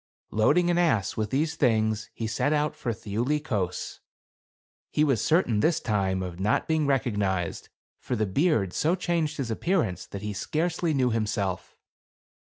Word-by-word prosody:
Loading 175 +11 +3
an 175 - +2
ass 115 - +2
with 110 -1 -2
these 150 +5 0
things, 110 -4 +1
he 115 - -3
set 110 +7 0
out 150 0 0
for 120 - -3
Thiuli 115 +7 -1
Kos. 100 - -3 0.9
He 150 - +2
was 135 -8 +2
certain, 155 - +2
this 165 +8 +2
time, 95 -4 0
of 90 -1 -6
not 105 +3 +1
being 155 -2 +1
recognized; 105 -10 -1 0.3
for 125 - -3
the 110 -1 +1
beard 105 - +1
so 165 +4 +2
changed 170 -4 -1
his 130 -5 -2
appear 175 - +1
ance, 90 -4 -5
that 100 0 -7
he 105 0 -3
scarcely 160 - -1
knew 130 -2 +2
himself. 105 -4 -2
115 Hz, 165 wpm, -27 LUFS, 105-155 Hz, 0.9 s, Loading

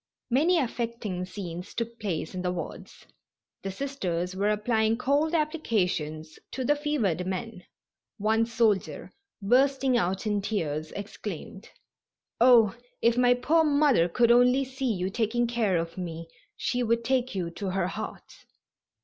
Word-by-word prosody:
Many 320 +8 +4
affecting 230 - -2
scenes 180 -1 -7
took 230 0 -4
place 185 -6 -3
in 185 - -4
the 180 0 -1
wards. 175 -3 -7 0.6
The 195 - -4
Sisters 185 -7 -3
were 200 +2 +1
applying 220 +1 +1
cold 290 +6 +1
applications 180 - -1
to 260 - -3
the 295 - +3
fevered 235 - -1
men. 190 0 -5 0.5
One 220 +2 +2
soldier, 225 -4 0 0.3
bursting 265 +3 +3
out 185 +3 -1
in 210 -1 0
tears, 160 -7 -2
exclaimed: 200 -1 -7 0.7
"Oh, 235 -3 +6 0.3
if 235 0 +4
my 245 0 +4
poor 310 +7 +3
mother 285 - +3
could 235 +6 +3
only 250 +3 +5
see 265 -1 -2
you 185 -2 -2
taking 235 +2 0
care 230 -6 +1
of 165 +2 -4
me 165 -2 -5 0.3
she 250 - -1
would 235 0 +1
take 255 -2 0
you 175 -3 -2
to 195 +2 -4
her 190 -1 0
heart." 215 +3 -8
220 Hz, 140 wpm, -27 LUFS, 185-250 Hz, 0.7 s, Oh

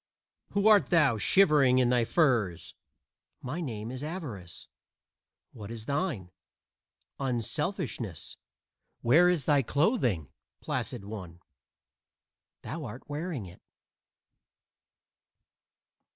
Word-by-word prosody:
"Who 200 +1 +2
art 205 -9 +6
thou, 150 -10 +3
shivering 145 - +5
in 125 -2 +3
thy 120 -2 +3
furs?" 115 - +1 0.7
"My 145 +7 -5
name 115 -6 -5
is 130 +2 -6
Avarice. 130 - -7 0.8
What 105 -3 -9
is 115 -1 -8
thine?" 140 - -2 0.9
"Unselfishness." 130 - -3 0.7
"Where 160 +10 +5
is 170 -7 +1
thy 145 -2 +4
clothing, 125 - 0 0.3
placid 115 -6 -4
one?" 95 -5 -8 1.2
"Thou 160 0 -5
art 120 +2 -9
wearing 150 - -4
it." 90 0 -14
130 Hz, 95 wpm, -29 LUFS, 110-160 Hz, 1.2 s, art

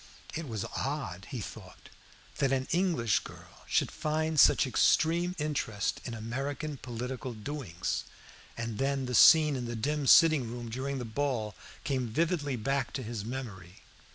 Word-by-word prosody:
It 165 -1 -4
was 110 -5 -3
odd, 120 - -3
he 130 -5 -4
thought, 95 -2 -10 0.5
that 135 -1 +2
an 130 -1 0
English 170 - +2
girl - - -13
should - - +1
find 155 0 -1
such - - +6
extreme 170 +7 +2
interest 140 -9 -2
in 120 - -4
American 135 +6 -4
political 125 +1 -5
doings, 105 - -4 0.5
and 115 -2 -4
then 135 -1 0
the 125 - -4
scene 150 +3 +7
in 125 -2 -3
the 120 0 -4
dim 145 +5 -1
sitting 155 -7 +6
room 120 -1 -6
during 135 +3 -3
the 125 - -4
ball 115 -3 -2 0.3
came 130 -3 -1
vividly 145 +2 0
back 135 +3 -1
to 130 - -3
his 110 -2 -5
memory. 105 -7 -7
130 Hz, 155 wpm, -30 LUFS, 115-145 Hz, 0.5 s, scene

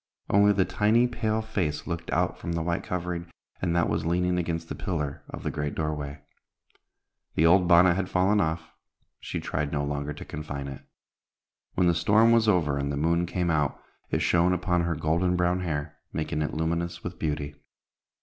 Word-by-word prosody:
Only 100 +1 +6
the 95 -2 +2
tiny 105 +6 +3
pale 110 -2 -1
face 95 -9 -2
looked 85 -1 -4
out - - 0
from 85 - -4
the 85 -1 -1
white 85 +1 -1
covering, 90 -1 -4 0.3
and 85 -2 0
that 85 - +3
was - - -1
leaning 90 +2 +1
against 85 -1 -2
the - - -4
pillar 75 -6 -3
of - - -7
the - - -1
great 75 -1 -3
doorway. 75 -2 -3 1.1
The 80 - +3
old 90 +2 +5
bonnet 85 0 +6
had 95 +1 -2
fallen 95 +3 +3
off; 80 +1 0
and 80 - -23 0.5
she - - -4
tried 70 -1 -2
no 75 -2 -1
longer 70 0 -2
to 75 - -9
confine 70 -2 -5
it. 70 -1 -7 0.9
When 90 - +3
the 85 - +4
storm 105 +7 +4
was 115 -1 +4
over 75 -8 +2
and 70 0 -1
the 70 - -2
moon 85 +3 +1
came 90 -1 0
out, 75 -3 0 0.3
it - - 0
shone 85 +1 +3
upon 90 -1 +1
her 85 -1 0
golden 85 +4 +1
brown 90 +1 +1
hair, 75 -4 -3
making 75 0 -2
it 75 - -2
luminous 85 +2 -2
with 90 0 -6
beauty. 75 -1 -2
85 Hz, 190 wpm, -27 LUFS, 75-90 Hz, 1.1 s, Only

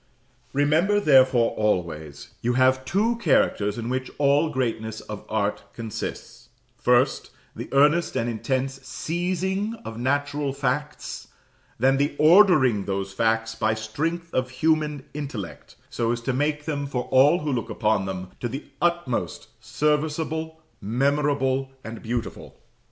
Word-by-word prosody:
Remember 155 +9 +3
therefore 130 - +5
always, 85 -8 -2
you 120 +1 +1
have 130 +1 +3
two 215 - +1
characters 120 - +2
in 115 -1 -4
which 130 +1 -2
all 145 +2 +3
greatness 115 -5 -2
of - - -8
art - - -1
consists: 115 -3 -7 0.3
First, - - +2 0.3
the - - -7
earnest 150 +5 +3
and 115 - 0
intense 130 +3 -2
seizing 185 - -2
of 115 0 -6
natural 145 +2 -1
facts; 140 +2 -3 0.5
then 135 +1 +3
the 145 +1 0
ordering 155 - +5
those 95 -1 -3
facts 115 +2 +1
by 110 -1 0
strength 160 +10 -3
of 130 0 0
human 150 +1 0
intellect, 135 - -7 0.2
so 115 -1 0
as 120 - -1
to 130 +2 -1
make 150 +3 -1
them, 145 -3 -2
for 125 -3 -2
all 145 +6 +5
who 150 -1 -2
look 120 -3 -2
upon 105 -3 +1
them, 95 -1 -5
to 120 - -3
the 135 +5 -6 0.2
utmost 170 -7 -1
serviceable, 155 +6 -1 0.2
memorable, 135 +3 +1
and 115 0 -8
beautiful. 115 -1 -5
135 Hz, 135 wpm, -24 LUFS, 115-150 Hz, 0.5 s, therefore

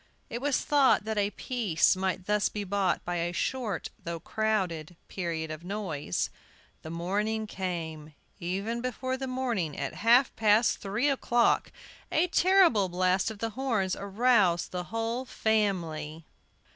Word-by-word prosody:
It 235 - -4
was 285 -1 +1
thought 280 -7 +3
that 220 -1 -1
a 200 0 +2
peace 210 -6 +1
might 185 -1 -2
thus 210 0 +2
be 210 - -4
bought 200 -1 0
by 175 0 -2
a 170 +1 -1
short, 215 0 -2
though 170 0 -4
crowded, 180 -5 -1
period 165 -4 -3
of 155 +1 -7
noise. 180 - -3 0.5
The 160 - -8
morning 205 +6 -1
came. 160 -6 -5 0.2
Even 195 +7 -2
before 255 +1 -2
the 265 0 -4
morning, 240 - -2
at 140 - -3
half 240 +4 +5
past 220 +1 +3
three 210 +8 0
o'clock, 240 -4 +2 0.4
a 320 - +3
terrible 350 - +4
blast 185 +2 +1
of 220 - -7
the 225 +2 -3
horns 220 -7 0
aroused 200 -3 +2
the 180 -1 -4
whole 225 +4 -2
family. 175 -10 -1
Mrs. - - -39
205 Hz, 145 wpm, -29 LUFS, 175-235 Hz, 0.5 s, half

